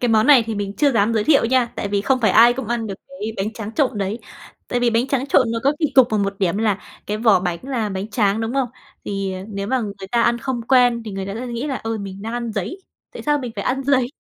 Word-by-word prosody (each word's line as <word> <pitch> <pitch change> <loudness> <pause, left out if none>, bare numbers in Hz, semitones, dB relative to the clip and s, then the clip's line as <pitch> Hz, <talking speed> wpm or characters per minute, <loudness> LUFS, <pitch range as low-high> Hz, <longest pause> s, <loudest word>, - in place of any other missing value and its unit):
Cái 245 - +1
món 220 -1 +3
này 280 -5 +7
thì 225 - -3
mình 200 -1 -3
chưa 290 -2 +3
dám 225 0 +2
giới 215 -2 +1
thiệu 290 -5 +4
nha, 250 +1 +3
tại 200 - -3
vì 200 0 0
không 255 +5 +1
phải 215 -4 +3
ai 230 +5 +7
cũng 245 -2 -5
ăn 235 -1 -1
được 195 - -4
cái 225 -6 -6
bánh 200 +3 -2
tráng 220 -1 -7
trộn 260 -7 0
đấy. 200 +3 -2 0.5
Tại 245 - -1
vì 245 -1 +3
bánh 230 +2 +1
tráng 270 -1 0
trộn 255 -4 +3
nó 230 - -1
có 280 - +4
kỳ 310 - +2
cục 260 -2 +7
ở 215 - +1
một 200 -1 -2
điểm 185 -2 +1
là 215 -3 +1 0.3
cái 210 - -2
vỏ 220 -4 +4
bánh 175 -2 -2
là 250 -5 -2
bánh 195 +1 -4
tráng, 210 -1 +1
đúng 225 +2 -3
không? 270 -2 +1 0.4
Thì, 195 -1 -3
à, 185 0 -6
nếu 200 -1 -4
mà 260 +4 0
người 200 -3 -6
ta 235 -1 +3
ăn 235 0 +2
không 255 -2 -3
quen 245 -1 +3
thì 215 - -6
người 195 0 -4
ta 195 - -5
sẽ 245 +3 -5
nghĩ 240 +3 -4
là, 275 - -2
ờ, 225 -2 -4
mình 195 0 -7
đang 225 - -5
ăn 235 -1 -3
giấy. 215 - -4 0.3
Tại - - -8
sao 295 0 +1
mình 250 -4 -5
phải - - -3
ăn 270 +2 -1
giấy? 265 -3 +3
225 Hz, 295 wpm, -21 LUFS, 205-255 Hz, 0.5 s, này